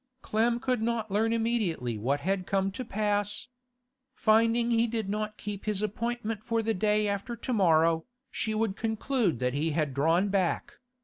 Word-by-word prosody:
Clem 235 +2 +1
could 250 -2 0
not 225 -2 -1
learn 220 +3 +2
immediately 220 - 0
what 135 +7 -1
had 190 +2 -1
come 195 0 +1
to 240 +6 -5
pass. 205 0 -1 0.7
Finding 230 +2 +3
he 230 0 +3
did 225 -3 -2
not 215 +1 -3
keep 205 -2 -6
his 210 -2 -1
appointment 225 0 -2
for 230 0 0
the 225 0 +1
day 210 +2 +2
after 200 +4 -2
to 250 - -4
morrow, 165 -4 +3 0.2
she 220 -1 -2
would 215 -3 0
conclude 220 - 0
that 125 +1 -1
he 150 +4 0
had 150 -4 0
drawn 165 +8 +2
back. 190 -3 -1
210 Hz, 170 wpm, -29 LUFS, 190-230 Hz, 0.7 s, Finding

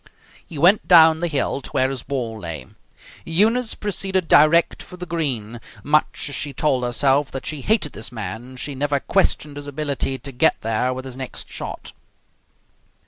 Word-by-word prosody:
He 160 - -10
went 180 +8 +4
down 160 -2 +7
the 175 - -1
hill 140 -2 -1
to - - -8
where 130 0 +1
his 135 -3 -4
ball 120 -5 -4
lay. 80 -8 -6 0.6
Eunice 220 +8 +2
proceeded 190 -3 -1
direct 155 +3 +4
for 180 - -11
the 180 - -6
green. 125 -10 -3 0.2
Much 150 +2 +1
as 145 - -4
she 140 +1 -2
told 135 -5 +1
herself 135 +3 +2
that 135 - -7
she 150 -3 -3
hated 200 - +1
this 110 - -5
man, 115 +3 -6
she 140 +3 -4
never 140 +1 0
questioned 145 +1 0
his 145 0 -7
ability 140 -2 -2
to 140 - -8
get 125 - +2
there 115 +3 0
with 130 +1 -5
his 130 -1 -8
next 130 -1 -8
shot. - - -6
140 Hz, 175 wpm, -21 LUFS, 130-160 Hz, 0.6 s, down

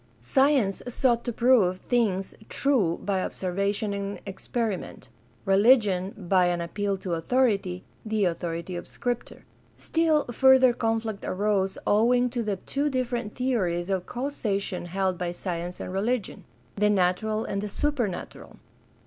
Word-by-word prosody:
Science 255 - +2
sought 240 -1 +1
to 240 - -2
prove 230 -6 +3
things 195 -4 0 0.2
true 225 -12 +1
by 195 -2 0
observation 200 +3 -2
and 200 0 -4
experiment; 200 - -4 0.4
religion, 195 -2 +4
by 185 -2 +2
an 175 -1 0
appeal 200 +4 -2
to 185 -2 -4
authority— 195 -1 +1 0.2
the 215 -2 0
authority 170 0 -3
of 175 - -6
Scripture. 245 -1 -4 0.3
Still 320 -2 +2
further 260 0 +6
conflict 225 -2 -2
arose 195 -1 0
owing 245 +4 +3
to 240 -1 -2
the. 210 -3 -1
two 280 +10 -2
different 245 -5 -2
theories 195 -9 0
of 185 -2 -1
causation 210 -9 -3
held 185 0 -1
by 175 -1 -2
science 175 0 -5
and 185 - -6
religion 215 +3 -2 0.2
— 120 -1 -34
the 210 +1 +2
natural 210 +3 +1
and 200 - -2
the 210 - -4
supernatural. 240 -7 -3
205 Hz, 135 wpm, -26 LUFS, 185-240 Hz, 0.4 s, further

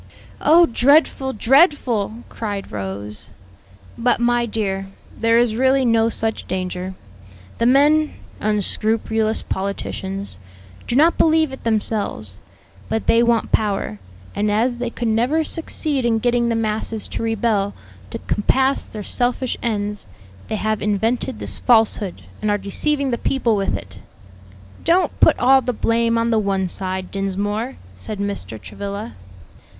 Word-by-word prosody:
"Oh, 335 +3 +6
dreadful, 270 +1 +3
dreadful!" 240 - +2
cried 205 -3 -5
Rose. 100 +1 -5 0.7
"But, 245 +1 +2
my 240 0 +2
dear, 195 -3 -2 0.3
there 230 0 +3
is 235 -2 +2
really 260 +2 +3
no 230 -1 +3
such 225 -1 -2
danger: 185 0 -4 0.6
the 230 - +3
men 295 +4 +4 0.3
(unscrupulous 215 +1 +1
politicians) 195 - -4 0.5
do 240 - -1
not 320 +5 +4
believe 315 -2 +4
it 265 - -9
themselves; 205 - -2 0.5
but 220 - -1
they 230 - +4
want 235 -1 +1
power, 195 - 0 0.3
and 210 +1 0
as 235 +4 +1
they 245 -1 -2
could 235 0 -4
never 245 +9 +2
succeed 305 -3 -1
in 235 -1 +2
getting 240 +1 +1
the 230 - 0
masses 220 0 -2
to - - -4
rebel 220 -3 0 0.3
to - - -5
compass 265 +6 +1
their 210 -1 -7
selfish 245 +3 0
ends, 210 - -2 0.4
they - - -2
have 215 0 -1
invented 220 +4 0
this - - -3
falsehood 220 -5 +2 0.2
and 215 - 0
are 205 - +2
deceiving 275 +8 -1
the 235 - -1
people 245 -5 +1
with 195 -1 0
it." 95 0 -12 0.8
"Don't 355 +3 +2
put - - +5
all 265 +2 +5
the 250 - -2
blame 230 +1 +1
on 230 0 +1
the 225 - +3
one 195 -2 0
side, 185 0 -4
Dinsmore," 205 +5 -2 0.2
said 150 - -7
Mr. 200 - -4
Travilla. 200 - -6
225 Hz, 140 wpm, -20 LUFS, 200-245 Hz, 0.8 s, Oh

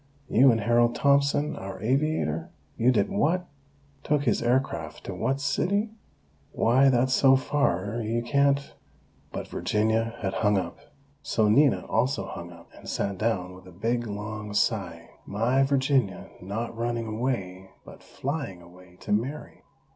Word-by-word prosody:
You 130 +3 +6
and 115 -1 0
Harold 120 +2 +3
Thompson? 140 +1 +2
Our 95 0 -7
aviator? 125 - 0 0.3
You 125 +3 +3
did 105 -5 +2
what? 175 - +1 0.6
Took 150 -1 +1
his 120 -5 +1
aircraft 125 +3 -1
to - - -6
what 135 +1 -1
city? 200 +10 0 0.6
Why, 130 +4 +4
that's 130 0 +2
so 135 +1 +6
far 115 -6 0
you 115 +2 -1
can't 140 +2 +1 0.3
" - - -35
but - - -5
Virginia 110 +2 0
had 95 -1 -1
hung 105 -2 +2
up. 90 -3 -4 0.4
So 110 -2 +1
Nina 140 +5 +4
also 115 -3 0
hung 85 -2 -8
up, 85 - -16
and - - -11
sat 100 -1 -2
down 100 -5 -1
with 95 0 -14
a - - -12
big, 115 +6 -2
long 105 0 -6
sigh: - - -1 0.2
"My 115 +6 +1
Virginia, 135 -6 +1
not 110 +5 -4
running 115 0 -2
away, 110 -5 -3 0.2
but - - -13
flying 135 - -5
away, 90 +1 -17
to - - -6
marry! 125 +9 -2
115 Hz, 150 wpm, -26 LUFS, 100-135 Hz, 0.6 s, You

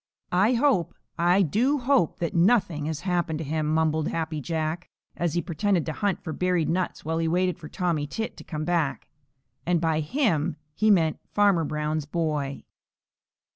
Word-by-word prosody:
"I 200 +7 +4
hope, 235 - +2 0.2
I 175 +3 +4
do 240 - +2
hope, 260 - +2
that 170 - -1
nothing 175 -4 +2
has 160 -1 -3
happened 175 -3 -1
to 160 - -5
him," 155 +1 -1
mumbled 160 -1 +1
Happy 160 -2 -2
Jack, 160 +2 -3 0.3
as 170 -2 -1
he 175 - 0
pretended 180 +1 0
to 160 - -3
hunt 205 +1 -1
for 160 - -4
buried 180 -2 +1
nuts 180 -2 -2
while 160 +1 -1
he 165 - 0
waited 180 +2 +1
for 155 -3 -9
Tommy 165 -5 -1
Tit 225 +9 -4
to - - -10
come 155 -2 -4
back, 165 -5 -1 0.5
and 175 -1 +1
by 160 -1 +1
"him" 160 - 0 0.2
he 215 +5 +2
meant 165 -6 +3
Farmer 200 -6 +3
Brown's 150 0 -2
boy. 150 -4 -2
165 Hz, 175 wpm, -26 LUFS, 155-185 Hz, 0.5 s, I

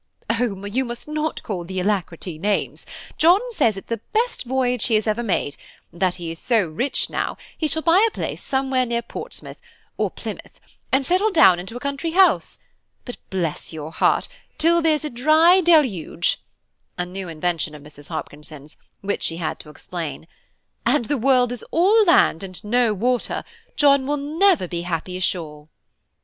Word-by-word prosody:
"Oh! 225 -4 -1
you 230 +6 0
must 240 +1 -7
not 305 +1 -3
call 185 -5 -4
the 185 +2 -4
Alacrity 180 -4 -2
names; 205 +3 -1 0.3
John 345 +4 +6
says 225 - +1
it's 195 - -9
the 230 -2 -3
best 465 - 0
voyage 250 -1 0
he 230 - +2
has 215 - +1
ever 215 +1 0
made; 185 -10 -1 0.3
and 170 - -15
that 185 -2 +2
he 170 -2 -6
is 165 - -8
so 225 -6 +2
rich 175 - -2
now, - - -2 0.2
he 315 - -1
shall 315 +2 -2
buy 350 +5 +5
a - - -4
place - - -4
somewhere 265 -1 0
near 235 0 -1
Portsmouth, - - -8 0.4
or - - 0
Plymouth, - - -9 0.3
and 265 +1 +2
settle 370 +8 +2
down 250 - +6
into 190 +7 -7
a - - -7
country 280 +4 -3
house; 380 0 +3 0.5
but, 245 - -7
bless 175 -5 -3
your 155 0 -6
heart, - - +2 0.3
till 340 +2 +3
there's 310 -2 +2
a - - -2
dry 310 +9 +5
deluge," 260 - +2 0.6
(a 180 - -1
new 185 +1 -7
invention 160 -1 -2
of 145 - -12
Mrs. 145 0 -12
Hopkinson's, 150 -2 -8 0.2
which 200 +1 -2
she 165 - -1
had 170 -2 -3
to 150 - -12
explain), 160 0 -6 0.6
"and 270 -6 +2
the 290 - 0
world 250 0 +3
is 245 - -5
all 405 +7 +4
land 335 - +4
and 185 -2 -8
no 235 +2 +2
water, 240 +4 -1 0.3
John 280 -2 +4
will 295 +1 0
never 315 - +2
be 170 0 -4
happy 175 +1 -4
ashore." 160 -5 -3
230 Hz, 175 wpm, -22 LUFS, 175-290 Hz, 0.6 s, John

